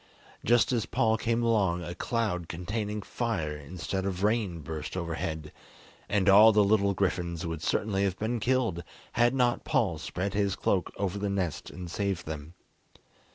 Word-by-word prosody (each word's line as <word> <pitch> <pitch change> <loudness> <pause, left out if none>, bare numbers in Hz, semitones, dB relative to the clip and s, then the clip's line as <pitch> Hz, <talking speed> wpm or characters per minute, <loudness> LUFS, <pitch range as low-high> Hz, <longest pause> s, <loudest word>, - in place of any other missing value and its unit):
Just 120 +1 +4
as 120 -3 0
Paul 110 0 +2
came 115 +1 0
along 95 -7 +2
a 85 - -5
cloud 95 -5 -2
containing 105 +4 -3
fire 100 -13 -2
instead 90 +6 -4
of 95 -1 -3
rain 105 -6 +1
burst 80 +3 -5
overhead, 80 -3 -3 0.6
and 100 -2 +1
all 105 +3 +9
the 105 -1 +5
little 100 -1 +3
griffins 85 -3 -1
would 80 -2 -4
certainly 100 +3 0
have 95 -2 0
been 115 +2 -1
killed 115 -8 0 0.3
had 120 +2 +3
not 125 -2 +2
Paul 110 - +1
spread 90 +4 -3
his 100 -2 +1
cloak 95 -3 0
over 100 0 -2
the 100 0 -1
nest 95 -6 -2
and 90 0 -8
saved 95 0 -2
them. 80 +2 -7
100 Hz, 160 wpm, -29 LUFS, 85-110 Hz, 0.6 s, all